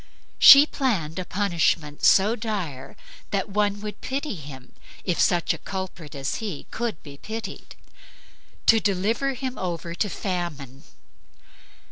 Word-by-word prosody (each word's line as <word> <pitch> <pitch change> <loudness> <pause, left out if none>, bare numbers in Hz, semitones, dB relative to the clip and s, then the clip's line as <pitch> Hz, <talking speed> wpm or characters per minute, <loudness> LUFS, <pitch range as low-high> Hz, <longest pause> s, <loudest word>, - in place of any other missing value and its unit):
She 280 +1 +10
planned 195 - -2
a 185 - -4
punishment 170 -6 0
so 205 +4 +5
dire 195 - -5 0.3
that 195 -1 -2
one 205 0 0
would 210 0 -7
pity 275 +1 -3
him, 140 -7 -10 0.3
if 180 -3 -1
such 175 -1 +2
a - - -8
culprit 185 -6 -7
as 135 -1 -3
he 200 -10 -5
could 230 -7 -4
be 140 -1 -11
pitied, 220 +7 -7 0.9
to 225 - +6
deliver 215 +7 0
him 260 0 -5
over 170 -2 -4
to 205 +4 -1
Famine. 155 - -4
190 Hz, 130 wpm, -24 LUFS, 160-220 Hz, 0.9 s, She